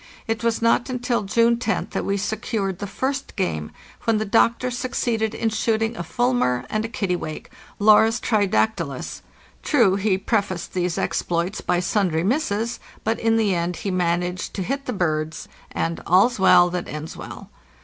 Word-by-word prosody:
It 225 Hz, 0 st, -2 dB
was 230 Hz, 0 st, 0 dB
not 230 Hz, +2 st, +3 dB
until 245 Hz, -1 st, -1 dB
June 230 Hz, +3 st, +3 dB
roth 220 Hz, -, -1 dB
that -, -, -2 dB
we 200 Hz, -, 0 dB
secured 200 Hz, -1 st, -2 dB
the 200 Hz, -, -4 dB
first 270 Hz, +6 st, -3 dB
game, 75 Hz, -, -2 dB, 0.4 s
when 225 Hz, -1 st, +3 dB
the 215 Hz, -, -1 dB
doctor 230 Hz, +4 st, +2 dB
succeeded 235 Hz, -3 st, -1 dB
in 225 Hz, -, 0 dB
shooting 225 Hz, +1 st, 0 dB
a -, -, -4 dB
fulmar 240 Hz, -, 0 dB
and 215 Hz, 0 st, 0 dB
a -, -, -2 dB
kittiwake 180 Hz, -8 st, -3 dB, 0.3 s
(Larus 220 Hz, +2 st, +5 dB
tridac 215 Hz, 0 st, +2 dB
tylus). 140 Hz, -8 st, -5 dB, 0.4 s
True, 225 Hz, -10 st, +3 dB
he 200 Hz, -1 st, +1 dB
prefaced 195 Hz, -3 st, -1 dB
these 180 Hz, -2 st, -1 dB
exploits 175 Hz, +4 st, -1 dB
by 175 Hz, -, +1 dB
sundry 175 Hz, -3 st, +1 dB
misses, 230 Hz, -, 0 dB, 0.2 s
but 225 Hz, +1 st, 0 dB
in 225 Hz, 0 st, +2 dB
the 210 Hz, -4 st, +2 dB
end 175 Hz, 0 st, -1 dB
he 195 Hz, -, -3 dB
managed 180 Hz, 0 st, -1 dB
to 190 Hz, -, -2 dB
hit 275 Hz, +7 st, -3 dB
the -, -, 0 dB
birds, 160 Hz, -6 st, -2 dB, 0.2 s
and 165 Hz, 0 st, -2 dB
'"all's 200 Hz, +6 st, +4 dB
well 180 Hz, -2 st, +6 dB
that 180 Hz, 0 st, -3 dB
ends 155 Hz, +1 st, -6 dB
well." -, -, -9 dB
205 Hz, 170 wpm, -23 LUFS, 180-230 Hz, 0.4 s, well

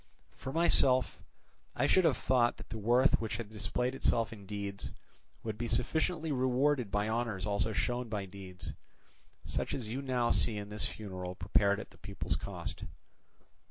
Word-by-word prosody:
For 130 Hz, -, -6 dB
myself, 135 Hz, -5 st, +4 dB, 0.5 s
I -, -, +2 dB
should 185 Hz, -, +4 dB
have 150 Hz, -6 st, +4 dB
thought 120 Hz, -2 st, +2 dB
that -, -, -11 dB
the 110 Hz, -, -5 dB
worth 120 Hz, +5 st, +4 dB
which 110 Hz, -1 st, -2 dB
had 115 Hz, -3 st, -6 dB
displayed 125 Hz, +4 st, -1 dB
itself 115 Hz, -4 st, +1 dB
in 100 Hz, -3 st, -12 dB
deeds 100 Hz, -1 st, -5 dB, 0.5 s
would 110 Hz, -1 st, -4 dB
be 120 Hz, -, -1 dB
sufficiently 160 Hz, +6 st, 0 dB
rewarded 130 Hz, -1 st, +2 dB
by 105 Hz, +1 st, 0 dB
honours 110 Hz, -4 st, -1 dB
also 105 Hz, +1 st, +1 dB
shown 120 Hz, +2 st, -1 dB
by 105 Hz, -3 st, -2 dB
deeds; 95 Hz, -1 st, -8 dB, 0.7 s
such -, -, -2 dB
as 115 Hz, -5 st, -4 dB
you 130 Hz, +5 st, -3 dB
now 125 Hz, -3 st, +1 dB
see 110 Hz, -3 st, +2 dB
in 100 Hz, 0 st, -5 dB
this 105 Hz, 0 st, 0 dB
funeral 95 Hz, -4 st, -6 dB
prepared 100 Hz, +2 st, +2 dB
at -, -, -8 dB
the -, -, -19 dB
people's 100 Hz, -2 st, -2 dB
cost. -, -, -5 dB
115 Hz, 165 wpm, -33 LUFS, 100-130 Hz, 0.7 s, myself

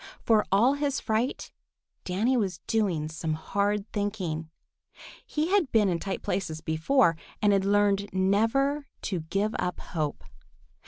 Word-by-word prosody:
For 220 Hz, -2 st, +3 dB
all 230 Hz, +8 st, +5 dB
his 285 Hz, -1 st, -1 dB
fright, 225 Hz, +4 st, -1 dB, 0.5 s
Danny 215 Hz, +8 st, +1 dB
was 195 Hz, -8 st, 0 dB
doing 185 Hz, -9 st, 0 dB
some 160 Hz, 0 st, -3 dB
hard 200 Hz, +5 st, -1 dB
thinking. 185 Hz, -7 st, -2 dB, 0.7 s
He 310 Hz, +2 st, -2 dB
had 380 Hz, -9 st, +3 dB
been 210 Hz, -3 st, +4 dB
in 170 Hz, -2 st, 0 dB
tight 195 Hz, +1 st, -4 dB
places 160 Hz, -5 st, -2 dB
before 165 Hz, -, +2 dB, 0.2 s
and 205 Hz, -1 st, +3 dB
had 195 Hz, -1 st, +2 dB
learned 200 Hz, 0 st, +2 dB
never 225 Hz, +10 st, +1 dB, 0.2 s
to 185 Hz, -4 st, -2 dB
give 195 Hz, +7 st, -1 dB
up 180 Hz, -1 st, -2 dB
hope. 155 Hz, -4 st, -3 dB
200 Hz, 140 wpm, -27 LUFS, 180-225 Hz, 0.7 s, all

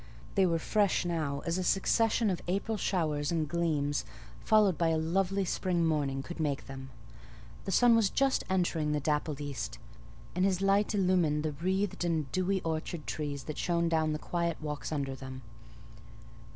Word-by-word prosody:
They 195 Hz, -2 st, +4 dB
were 165 Hz, -1 st, +2 dB
fresh 200 Hz, +3 st, +1 dB
now 155 Hz, -5 st, -2 dB
as 170 Hz, +2 st, 0 dB
a -, -, -1 dB
succession 220 Hz, +4 st, +2 dB
of 180 Hz, -, -3 dB
April 200 Hz, +5 st, -1 dB
showers 160 Hz, -6 st, 0 dB
and 160 Hz, -2 st, 0 dB
gleams, 150 Hz, -3 st, 0 dB, 0.4 s
followed 210 Hz, -4 st, +4 dB
by 170 Hz, -, +1 dB
a 160 Hz, -1 st, +2 dB
lovely 190 Hz, +4 st, 0 dB
spring 175 Hz, -2 st, 0 dB
morning, 140 Hz, -4 st, 0 dB
could 175 Hz, +3 st, -8 dB
make 145 Hz, -3 st, -1 dB
them: 135 Hz, 0 st, -8 dB, 0.8 s
the 195 Hz, -, -2 dB
sun 240 Hz, +4 st, +6 dB
was 220 Hz, -3 st, +3 dB
just 270 Hz, +4 st, +1 dB
entering 170 Hz, -5 st, +1 dB
the 150 Hz, -, +1 dB
dappled 150 Hz, 0 st, -1 dB
east, 145 Hz, -2 st, -4 dB, 0.6 s
and 180 Hz, -, 0 dB
his 190 Hz, -2 st, +2 dB
light 200 Hz, +2 st, +2 dB
illumined 180 Hz, -6 st, +2 dB
the 155 Hz, -, -1 dB
wreathed 185 Hz, +6 st, -1 dB
and 160 Hz, -5 st, -1 dB
dewy 185 Hz, +1 st, 0 dB
orchard 160 Hz, 0 st, -3 dB
trees 145 Hz, -2 st, -4 dB
and 155 Hz, -, -4 dB
shone 170 Hz, -1 st, +1 dB
down 160 Hz, -1 st, +1 dB
the 155 Hz, -, -1 dB
quiet 170 Hz, +1 st, -2 dB
walks 150 Hz, -1 st, -5 dB
under 140 Hz, -3 st, -2 dB
them. 130 Hz, -1 st, -8 dB
170 Hz, 170 wpm, -31 LUFS, 150-190 Hz, 0.8 s, sun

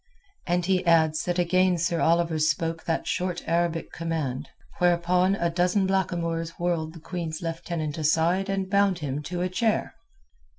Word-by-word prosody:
And 175 Hz, 0 st, +1 dB
he 185 Hz, 0 st, +2 dB
adds 160 Hz, -2 st, +3 dB
that 175 Hz, 0 st, -1 dB
again 180 Hz, +1 st, +3 dB
Sir 170 Hz, 0 st, 0 dB
Oliver 165 Hz, -1 st, +2 dB
spoke 160 Hz, +1 st, 0 dB
that 165 Hz, -, -1 dB
short 180 Hz, -1 st, -2 dB
Arabic 170 Hz, 0 st, 0 dB
command, 160 Hz, -6 st, -3 dB, 0.3 s
whereupon 180 Hz, +2 st, +3 dB
a 170 Hz, -3 st, 0 dB
dozen 180 Hz, +3 st, +2 dB
blackamoors 170 Hz, -3 st, -1 dB
whirled 170 Hz, -2 st, -1 dB
the 170 Hz, -, -11 dB
Queen's 165 Hz, -1 st, -5 dB
Lieutenant 165 Hz, -2 st, -3 dB
aside 165 Hz, +5 st, +2 dB
and 195 Hz, -1 st, -1 dB
bound 200 Hz, -1 st, +2 dB
him 145 Hz, -3 st, -3 dB
to 175 Hz, +4 st, -3 dB
a -, -, +1 dB
chair. 220 Hz, +4 st, 0 dB
170 Hz, 155 wpm, -26 LUFS, 165-180 Hz, 0.3 s, adds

